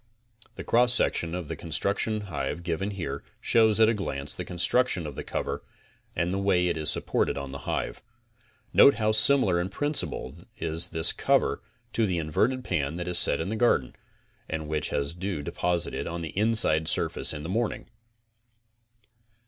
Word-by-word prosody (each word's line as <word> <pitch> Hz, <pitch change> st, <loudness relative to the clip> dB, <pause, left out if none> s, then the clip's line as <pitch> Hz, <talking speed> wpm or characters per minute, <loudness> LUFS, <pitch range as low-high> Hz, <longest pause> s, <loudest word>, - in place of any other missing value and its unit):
The -, -, -7 dB
cross 120 Hz, +1 st, +3 dB
section 85 Hz, -7 st, 0 dB
of 90 Hz, -4 st, -5 dB
the -, -, -4 dB
Constructive 100 Hz, +6 st, -2 dB
Hive 90 Hz, -3 st, -4 dB
given 85 Hz, +3 st, -2 dB
here 95 Hz, -4 st, -5 dB, 0.2 s
shows 110 Hz, -2 st, +3 dB
at 110 Hz, -, +6 dB
a 115 Hz, -, +3 dB
glance 70 Hz, -9 st, -4 dB
the -, -, -5 dB
consrtuction 90 Hz, +1 st, +1 dB
of 75 Hz, -, -6 dB
the -, -, -6 dB
cover -, -, -4 dB, 0.5 s
and 85 Hz, +2 st, -1 dB
the 95 Hz, -, -1 dB
way 90 Hz, -3 st, +2 dB
it 85 Hz, -, -1 dB
is 75 Hz, -2 st, 0 dB
supported -, -, 0 dB
on 70 Hz, -1 st, -5 dB
the 70 Hz, -, -9 dB
hive. -, -, -3 dB, 0.7 s
Note 140 Hz, -, +7 dB
how 110 Hz, -1 st, +1 dB
similar 110 Hz, -5 st, +4 dB
in 90 Hz, -, -3 dB
principle 90 Hz, -, -2 dB, 0.2 s
is 80 Hz, +1 st, -1 dB
this 80 Hz, 0 st, +2 dB
cover -, -, +1 dB, 0.3 s
to 115 Hz, -2 st, +1 dB
the 90 Hz, -2 st, -1 dB
inverted 85 Hz, +11 st, 0 dB
pan 75 Hz, -, -2 dB
that 85 Hz, 0 st, -5 dB
is 90 Hz, -1 st, +2 dB
set -, -, +5 dB
in 80 Hz, -, -3 dB
the 110 Hz, -, -2 dB
garden 110 Hz, -, +1 dB, 0.5 s
and 80 Hz, -1 st, -4 dB
which 75 Hz, -1 st, -2 dB
has 70 Hz, +2 st, -2 dB
dew 90 Hz, -3 st, -4 dB
deposited 85 Hz, +3 st, -2 dB
on 85 Hz, +1 st, -4 dB
the 80 Hz, -, -4 dB
inside 105 Hz, -7 st, +3 dB
surface -, -, +2 dB
in 75 Hz, -1 st, -5 dB
the -, -, -5 dB
morning. 115 Hz, +4 st, -2 dB
90 Hz, 175 wpm, -27 LUFS, 80-110 Hz, 0.7 s, Note